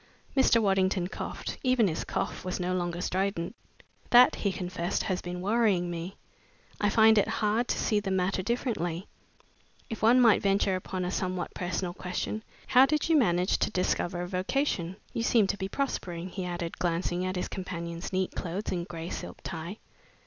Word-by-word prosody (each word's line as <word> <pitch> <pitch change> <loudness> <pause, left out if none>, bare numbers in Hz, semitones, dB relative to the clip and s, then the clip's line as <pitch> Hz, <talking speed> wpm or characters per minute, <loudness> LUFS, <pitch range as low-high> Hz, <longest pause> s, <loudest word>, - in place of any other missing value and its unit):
Mr. 265 -3 +5
Waddington 190 -3 +2
coughed. - - -5
Even 255 -4 +3
his 160 -3 -2
cough - - -3
was 185 0 -3
no 180 0 -1
longer 175 -1 -2
strident. 190 +1 -1 0.5
"That," 245 +1 +8
he 200 - -1
confessed, 180 -2 -2
"has 185 -4 -1
been 180 0 -5
worrying 200 -4 +2
me. 170 +3 -5 0.6
I 205 - +2
find 220 +1 +6
it - - +2
hard 220 +3 0
to - - 0
see 210 - +1
the 200 -1 -4
matter 190 0 +1
differently. 190 -6 -2 0.9
If 225 - -5
one 235 +3 +6
might 230 -4 +6
venture 195 -1 +2
upon 185 0 -3
a 180 - -2
somewhat 185 -1 -2
personal 175 0 -2
question, 185 +4 -3 0.2
how 260 +1 +6
did 305 +3 0
you 325 - +5
manage 180 - +3
to - - +1
discover 180 -2 -1
a - - -4
vocation? 185 - -1 0.2
You - - -1
seem 230 -2 +4
to 195 - 0
be 190 0 -3
prospering," 185 -10 -3
he 185 0 -5
added, 175 -1 -4
glancing 175 +1 0
at 185 0 -2
his 180 - -2
companion's 170 -2 -5
neat 185 -1 0
clothes 185 +5 -4
and 175 -1 -2
gray 165 0 -6
silk - - -6
tie. 170 +4 -5
185 Hz, 180 wpm, -29 LUFS, 175-215 Hz, 0.9 s, That